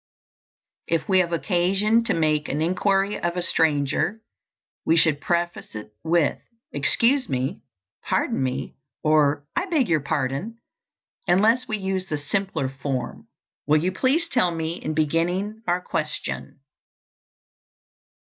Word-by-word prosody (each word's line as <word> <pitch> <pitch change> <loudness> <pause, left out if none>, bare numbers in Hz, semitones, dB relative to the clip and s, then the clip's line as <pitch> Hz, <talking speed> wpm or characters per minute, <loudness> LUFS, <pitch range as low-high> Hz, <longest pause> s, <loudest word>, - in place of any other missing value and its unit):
If 165 +4 0
we 190 -2 +4
have 175 -2 +1
occasion 185 - +2
to - - +1
make 155 -2 +1
an 145 - -1
inquiry 195 +4 +1
of 175 -1 -1
a 180 - +1
stranger, 160 +6 +1 0.6
we 165 - +3
should 155 -3 +3
preface 175 -4 -2
it 105 0 -8
with, 165 -2 +2 0.3
"Excuse 245 - +3
me," 130 0 -2 0.4
"Pardon - - 0
me," 130 +1 -2 0.3
or, 150 -2 +3
"I 360 +3 0
beg 300 - +1
your 160 -2 +3
pardon," 140 - -2 0.7
unless 220 +8 +3
we 215 - -1
use 190 -1 -2
the 155 - -2
simpler 160 -1 -2
form, 135 -1 -4 0.4
"Will 150 +1 +5
you 175 +5 0
please 270 - +1
tell 245 - +2
me," 165 0 -3
in 155 - -3
beginning 175 +8 0
our 175 +1 +1
question. 155 -4 -4
170 Hz, 130 wpm, -24 LUFS, 150-195 Hz, 0.7 s, Will